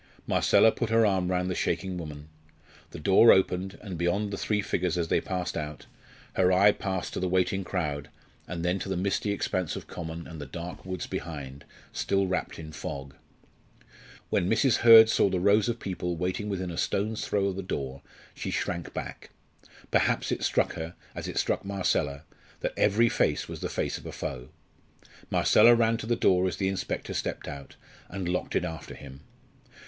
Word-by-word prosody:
Marcella 110 Hz, -, +4 dB
put 110 Hz, -, -3 dB
her 115 Hz, 0 st, +4 dB
arm 95 Hz, -3 st, +1 dB
round 90 Hz, 0 st, 0 dB
the 90 Hz, -, -1 dB
shaking 95 Hz, +1 st, -1 dB
woman. 75 Hz, -3 st, -7 dB, 0.6 s
The -, -, -9 dB
door 95 Hz, +8 st, +6 dB
opened; 95 Hz, 0 st, +1 dB
and 95 Hz, -6 st, -6 dB
beyond 100 Hz, +4 st, 0 dB
the -, -, -2 dB
three 105 Hz, -1 st, 0 dB
figures 90 Hz, -2 st, -1 dB
as 85 Hz, -2 st, -1 dB
they -, -, +2 dB
passed 90 Hz, -1 st, -3 dB
out, 75 Hz, -1 st, -5 dB, 0.5 s
her 95 Hz, -1 st, +3 dB
eye 100 Hz, +3 st, +6 dB
passed 95 Hz, -3 st, -4 dB
to -, -, -2 dB
the 95 Hz, -, 0 dB
waiting 95 Hz, +2 st, +1 dB
crowd, 75 Hz, -6 st, -3 dB, 0.4 s
then 90 Hz, +2 st, -1 dB
to 95 Hz, -, -5 dB
the 95 Hz, -, -1 dB
misty 100 Hz, +3 st, 0 dB
expanse 95 Hz, -4 st, -1 dB
of -, -, -7 dB
common 85 Hz, -1 st, -7 dB
and 80 Hz, -3 st, -9 dB
the 70 Hz, -, -7 dB
dark 85 Hz, +5 st, -7 dB
woods 95 Hz, -1 st, -4 dB
behind, 70 Hz, -4 st, -6 dB, 0.3 s
still 100 Hz, 0 st, +1 dB
wrapped 90 Hz, -1 st, -2 dB
in 80 Hz, -1 st, -8 dB
fog. 70 Hz, -1 st, -6 dB, 1.2 s
When 90 Hz, -, +1 dB
Mrs. 115 Hz, +3 st, +3 dB
Hurd 115 Hz, -1 st, +9 dB
saw 105 Hz, -, +3 dB
the 95 Hz, -1 st, 0 dB
rows 100 Hz, +4 st, +3 dB
of 120 Hz, 0 st, -2 dB
people 90 Hz, -3 st, -3 dB
waiting 90 Hz, +5 st, -2 dB
within 95 Hz, -3 st, -3 dB
a 85 Hz, -, -4 dB
stone's 105 Hz, +2 st, -1 dB
throw 100 Hz, -1 st, 0 dB
of 100 Hz, -2 st, -1 dB
the 95 Hz, -, -3 dB
door 70 Hz, -7 st, -4 dB, 0.3 s
she -, -, -5 dB
shrank 85 Hz, -2 st, -3 dB
back. -, -, -6 dB, 0.6 s
Perhaps -, -, +2 dB
it -, -, -1 dB
struck -, -, +1 dB
her, 80 Hz, +1 st, -6 dB, 0.2 s
as -, -, -6 dB
it -, -, -5 dB
struck -, -, 0 dB
Marcella, 90 Hz, -7 st, -1 dB, 0.4 s
that -, -, -2 dB
every 110 Hz, +3 st, +3 dB
face -, -, +1 dB
was -, -, -7 dB
the -, -, -3 dB
face -, -, -2 dB
of -, -, -10 dB
a -, -, -5 dB
foe. 65 Hz, -2 st, -6 dB, 0.8 s
Marcella 115 Hz, +2 st, +6 dB
ran 115 Hz, 0 st, +2 dB
to 110 Hz, -, -7 dB
the 120 Hz, -, +2 dB
door 95 Hz, -3 st, +3 dB
as 90 Hz, -, -3 dB
the 95 Hz, -1 st, 0 dB
inspector 95 Hz, -, -3 dB
stepped -, -, -3 dB
out, 70 Hz, -2 st, -8 dB, 0.3 s
and 95 Hz, -1 st, -4 dB
locked 90 Hz, +1 st, -2 dB
it 90 Hz, -, +1 dB
after 80 Hz, -2 st, -7 dB
him. 70 Hz, -1 st, -11 dB
90 Hz, 190 wpm, -28 LUFS, 85-100 Hz, 1.2 s, Hurd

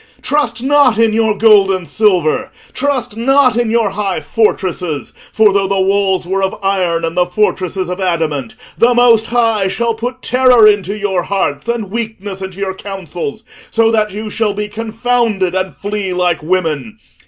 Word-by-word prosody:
Trust 290 Hz, -4 st, -1 dB
not 275 Hz, -4 st, +3 dB
in 225 Hz, -1 st, +3 dB
your 220 Hz, -2 st, +1 dB
gold 210 Hz, -2 st, +5 dB
and 185 Hz, -3 st, -2 dB
silver, 205 Hz, -, +1 dB, 0.2 s
trust 260 Hz, -5 st, -2 dB
not 255 Hz, +1 st, +3 dB
in 240 Hz, -1 st, 0 dB
your 225 Hz, -3 st, +1 dB
high 195 Hz, -3 st, -2 dB
fortresses; 175 Hz, -, -2 dB, 0.2 s
for, 215 Hz, -2 st, +3 dB
though 195 Hz, -1 st, +1 dB
the 195 Hz, 0 st, 0 dB
walls 190 Hz, -1 st, +1 dB
were 190 Hz, +2 st, -1 dB
of 190 Hz, 0 st, -1 dB
iron, 180 Hz, -4 st, 0 dB
and 165 Hz, +1 st, -4 dB
the 180 Hz, 0 st, +2 dB
fortresses 185 Hz, -1 st, -1 dB
of 180 Hz, +2 st, -5 dB
adamant, 160 Hz, -9 st, -2 dB, 0.2 s
the 240 Hz, +1 st, +4 dB
Most 235 Hz, -2 st, +4 dB
High 225 Hz, -4 st, +1 dB
shall 230 Hz, +4 st, -1 dB
put 245 Hz, +3 st, -6 dB
terror 250 Hz, -3 st, +5 dB
into 205 Hz, -1 st, +1 dB
your 195 Hz, -3 st, -1 dB
hearts 195 Hz, +5 st, -2 dB
and 230 Hz, -5 st, -3 dB
weakness 210 Hz, -4 st, -5 dB
into 190 Hz, -1 st, -7 dB
your 195 Hz, -1 st, -3 dB
councils, 195 Hz, +2 st, -6 dB, 0.3 s
so 225 Hz, 0 st, +2 dB
that 215 Hz, -2 st, +1 dB
you 210 Hz, +2 st, -6 dB
shall 210 Hz, -2 st, -1 dB
be 210 Hz, 0 st, -3 dB
confounded 225 Hz, -3 st, -1 dB
and 185 Hz, 0 st, -2 dB
flee 205 Hz, -2 st, -3 dB
like 180 Hz, -2 st, 0 dB
women. 180 Hz, +4 st, -2 dB
205 Hz, 170 wpm, -15 LUFS, 185-230 Hz, 0.3 s, gold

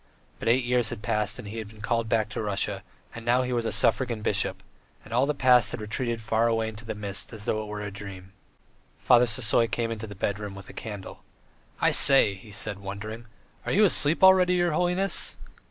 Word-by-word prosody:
But -, -, -6 dB
eight 120 Hz, +3 st, +3 dB
years 120 Hz, -2 st, +1 dB
had 120 Hz, -4 st, -8 dB
passed 105 Hz, -2 st, 0 dB
and -, -, -9 dB
he 110 Hz, +3 st, -6 dB
had 110 Hz, -, -7 dB
been 105 Hz, +1 st, -16 dB
called 115 Hz, 0 st, -1 dB
back 110 Hz, -2 st, 0 dB
to 105 Hz, -, -5 dB
Russia, 100 Hz, -2 st, -2 dB, 0.3 s
and 115 Hz, -, -9 dB
now 120 Hz, +2 st, +2 dB
he 125 Hz, 0 st, -3 dB
was 120 Hz, -1 st, -1 dB
a -, -, -2 dB
suffragan 115 Hz, -2 st, 0 dB
bishop, -, -, -1 dB, 0.4 s
and 110 Hz, -, -10 dB
all 125 Hz, +4 st, +2 dB
the 150 Hz, -, -1 dB
past 125 Hz, -4 st, +4 dB
had -, -, -6 dB
retreated 115 Hz, +2 st, -4 dB
far 110 Hz, +1 st, +1 dB
away 115 Hz, -1 st, 0 dB
into 110 Hz, +1 st, -11 dB
the 110 Hz, -, -5 dB
mist 100 Hz, -1 st, -4 dB
as 105 Hz, -2 st, -6 dB
though 110 Hz, -, -1 dB
it 105 Hz, -, -8 dB
were 105 Hz, 0 st, -6 dB
a 105 Hz, -, -6 dB
dream.... 100 Hz, -1 st, -10 dB, 0.7 s
Father 125 Hz, 0 st, +4 dB
Sisoy 115 Hz, -1 st, +2 dB
came 115 Hz, -2 st, -2 dB
into 110 Hz, 0 st, -6 dB
the 100 Hz, -, -10 dB
bedroom 100 Hz, +1 st, -4 dB
with 100 Hz, -1 st, -11 dB
a -, -, -11 dB
candle. 105 Hz, -4 st, -8 dB, 0.6 s
"I -, -, +3 dB
say!" 135 Hz, -7 st, +7 dB
he 100 Hz, +2 st, -14 dB
said, 100 Hz, 0 st, -4 dB
wondering, 110 Hz, +4 st, -8 dB, 0.4 s
"are -, -, -4 dB
you 210 Hz, +4 st, +4 dB
asleep 160 Hz, -2 st, +2 dB
already, 185 Hz, -1 st, +6 dB
your 175 Hz, -1 st, +1 dB
holiness?" 180 Hz, +4 st, -1 dB
115 Hz, 220 wpm, -26 LUFS, 105-125 Hz, 0.7 s, say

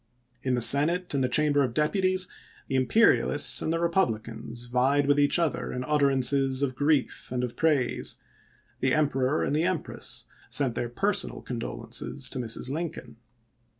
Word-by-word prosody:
In 130 Hz, -1 st, 0 dB
the 120 Hz, -, +1 dB
Senate 165 Hz, +8 st, +3 dB
and 135 Hz, -2 st, 0 dB
the 130 Hz, -, 0 dB
Chamber 145 Hz, +1 st, +2 dB
of 120 Hz, -3 st, -3 dB
Deputies 185 Hz, +4 st, +1 dB, 0.4 s
the -, -, -6 dB
imperialists 145 Hz, -, +3 dB
and 160 Hz, -, -2 dB
the 165 Hz, -, 0 dB
republicans 120 Hz, -, -2 dB
vied 130 Hz, +4 st, +1 dB
with 145 Hz, +1 st, +2 dB
each 145 Hz, +3 st, +3 dB
other 165 Hz, -4 st, -1 dB
in 125 Hz, -, -4 dB
utterances 135 Hz, -1 st, +2 dB
of 130 Hz, -2 st, -1 dB
grief 145 Hz, -2 st, -1 dB
and 125 Hz, -1 st, -2 dB
of 120 Hz, -1 st, -4 dB
praise; 150 Hz, -6 st, 0 dB, 0.6 s
the 130 Hz, 0 st, +1 dB
Emperor 145 Hz, -2 st, 0 dB
and 145 Hz, -, -1 dB
the 155 Hz, -, +1 dB
Empress 185 Hz, -4 st, -3 dB, 0.2 s
sent 130 Hz, 0 st, +1 dB
their 120 Hz, -, -3 dB
personal 195 Hz, -, -1 dB
condolences 120 Hz, -2 st, -3 dB
to -, -, -3 dB
Mrs. 120 Hz, +2 st, +1 dB
Lincoln. 145 Hz, -7 st, -6 dB
140 Hz, 155 wpm, -26 LUFS, 125-155 Hz, 0.6 s, Senate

